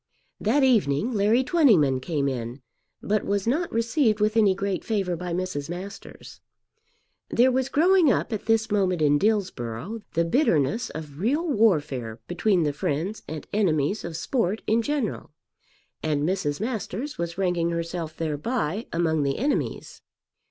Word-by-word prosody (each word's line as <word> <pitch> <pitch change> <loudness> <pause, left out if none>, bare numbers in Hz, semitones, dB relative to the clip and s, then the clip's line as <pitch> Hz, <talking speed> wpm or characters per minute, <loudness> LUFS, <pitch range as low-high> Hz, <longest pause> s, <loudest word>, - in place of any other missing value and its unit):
That 270 +7 +2
evening 220 - +2
Larry 215 +4 +3
Twentyman 215 - +4
came 140 +1 -1
in, 125 0 -4 0.4
but 210 0 0
was 200 -1 -1
not 305 +9 0
received 230 0 +1
with 215 +1 +1
any 205 -4 +4
great 195 -1 -2
favour 195 -6 -1
by 180 +1 -5
Mrs. 175 -5 -3
Masters. 190 +4 -9 0.9
There 250 +2 +4
was 260 +1 0
growing 345 -1 +4
up 245 - -1
at 215 - -5
this 225 -1 +2
moment 185 -5 +1
in 145 0 +4
Dillsborough 195 - -1
the 170 0 +2
bitterness 220 - +1
of 150 -2 -8
real 285 - 0
warfare 150 - +1
between 175 0 +1
the 150 -1 0
friends 155 +9 -2
and 155 -1 -6
enemies 190 -2 +1
of 165 -2 -5
sport 215 +1 -1
in 225 +2 +2
general, 275 -3 -2 0.7
and 150 -2 0
Mrs. 160 -4 -1
Masters 225 - -4
was 170 0 -3
ranking 180 -3 +1
herself 170 -1 -4
thereby 165 - -2
among 160 -2 +1
the 140 -1 0
enemies. 285 +5 -2
190 Hz, 145 wpm, -25 LUFS, 155-225 Hz, 0.9 s, Twentyman